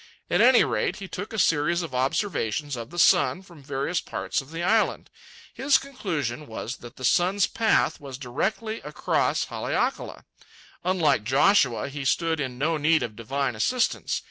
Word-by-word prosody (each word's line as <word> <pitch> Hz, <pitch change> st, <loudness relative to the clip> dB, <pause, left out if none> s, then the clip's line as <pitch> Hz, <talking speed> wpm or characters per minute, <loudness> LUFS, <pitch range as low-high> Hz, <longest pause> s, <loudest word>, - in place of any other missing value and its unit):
At -, -, +3 dB
any -, -, +7 dB
rate, -, -, -1 dB
he 195 Hz, -, -8 dB
took 200 Hz, +3 st, -6 dB
a 220 Hz, -, -5 dB
series 170 Hz, -1 st, +2 dB
of 160 Hz, -, -7 dB
observations 135 Hz, -, -1 dB
of 115 Hz, -1 st, -7 dB
the 175 Hz, -, -10 dB
sun 180 Hz, +2 st, +4 dB
from 170 Hz, -6 st, -15 dB
various 140 Hz, +5 st, -2 dB
parts -, -, -3 dB
of 135 Hz, -, -15 dB
the 165 Hz, +2 st, -5 dB
island. 220 Hz, +4 st, +1 dB, 0.4 s
His 275 Hz, +1 st, +3 dB
conclusion 155 Hz, -, -4 dB
was 115 Hz, +2 st, -6 dB
that 120 Hz, 0 st, -12 dB
the 130 Hz, -, -5 dB
sun's 185 Hz, +7 st, +3 dB
path 225 Hz, -1 st, +1 dB
was 135 Hz, -3 st, -8 dB
directly 195 Hz, -, -3 dB
across -, -, 0 dB
Haleakala. -, -, -3 dB, 0.6 s
Unlike 165 Hz, -, +2 dB
Joshua, 135 Hz, -, +3 dB
he 140 Hz, 0 st, -6 dB
stood 160 Hz, +3 st, +1 dB
in 130 Hz, -3 st, -4 dB
no 155 Hz, +4 st, 0 dB
need 155 Hz, -1 st, +3 dB
of 110 Hz, -3 st, -5 dB
divine 130 Hz, +3 st, -2 dB
assistance. 245 Hz, -, 0 dB
150 Hz, 165 wpm, -25 LUFS, 130-185 Hz, 0.6 s, any